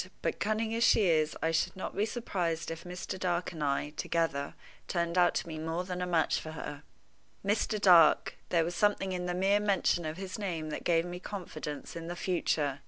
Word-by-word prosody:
"But, - - -1
cunning 220 +1 0
as 230 +1 +1
she 215 - +5
is, 155 -3 +2
I 160 - +2
should 160 +3 0
not 190 - -5
be 210 +2 +1
surprised 175 -9 -2
if 165 +2 -7
Mr. 180 +1 -5
Dark 175 -1 0
and 160 -3 -5
I, 145 +1 0
together, 155 -2 -1 0.3
turned 170 -1 -1
out 175 -1 +4
to - - 0
be 160 -2 -6
more 165 +3 -2
than 180 0 -4
a 180 - -1
match 165 -3 +2
for 155 - -7
her." 150 -2 -6 0.6
Mr. 210 +1 +1
Dark! 175 -6 +6
There 170 -2 +3
was 175 - -3
something 205 -1 +1
in 180 -1 -2
the 175 - -1
mere 195 +3 +3
mention 200 -4 +2
of 155 +2 -5
his 190 +1 -6
name 165 -6 -3
that - - -4
gave 165 -1 +2
me 175 0 -6
confidence 165 -7 -6
in 165 0 -6
the 175 - -4
future. 155 -6 0
175 Hz, 210 wpm, -31 LUFS, 160-190 Hz, 0.6 s, Dark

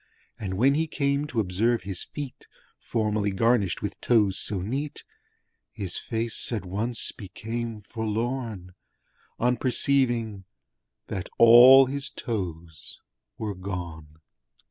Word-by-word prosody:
And 95 -3 -4
when 130 +8 +4
he 160 +3 0
came 140 -1 0
to 120 - -2
observe 110 +3 +1
his 95 -2 -4
feet 145 -4 -8 0.3
Formerly 105 -2 -1
garnished 100 -2 +1
with 100 -1 -5
toes 105 -6 +3
so 100 - -1
neat 140 +8 -4 0.7
His 100 -5 -5
face 115 0 -1
at 110 -5 -3
once 110 +6 -2
became 115 +2 -6
forlorn 110 -3 -3 0.6
On 125 +1 +1
perceiving 120 -6 0 0.6
that 95 -3 -5
all 125 +4 +9
his 140 +2 -3
toes 85 - -6 0.4
were 105 -2 -3
gone! 85 -5 -7
110 Hz, 115 wpm, -26 LUFS, 95-125 Hz, 0.7 s, all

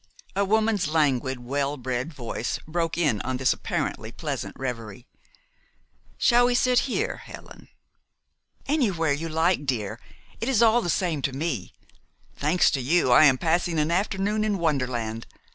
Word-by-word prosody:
A 200 - +2
woman's 215 -1 +1
languid, 135 -5 +1
well 140 +3 -2
bred 130 +3 -3
voice 120 -4 -4
broke 165 0 -2
in 145 - +1
on 130 -1 -3
this 130 0 +2
apparently - - -3
pleasant - - -5
reverie. 120 -3 -5 1.1
"Shall 245 0 +4
we 245 - +1
sit 250 +2 +2
here, 430 - -1
Helen?" - - -12 1.0
"Anywhere 195 - +1
you 165 +3 -4
like, 160 -1 +1
dear. 110 -3 -2 0.4
It 230 - -2
is 235 -4 +3
all 230 +1 +5
the 175 - -3
same 165 -4 0
to 135 - -1
me. 135 - -3 0.6
Thanks 155 +5 +2
to 135 - -1
you, 140 +1 +2
I 140 +5 +8
am 135 -3 +5
passing 170 +2 0
an 155 +2 +1
afternoon 200 +3 0
in 210 -2 0
wonderland. 125 -8 -2
155 Hz, 150 wpm, -25 LUFS, 130-195 Hz, 1.1 s, I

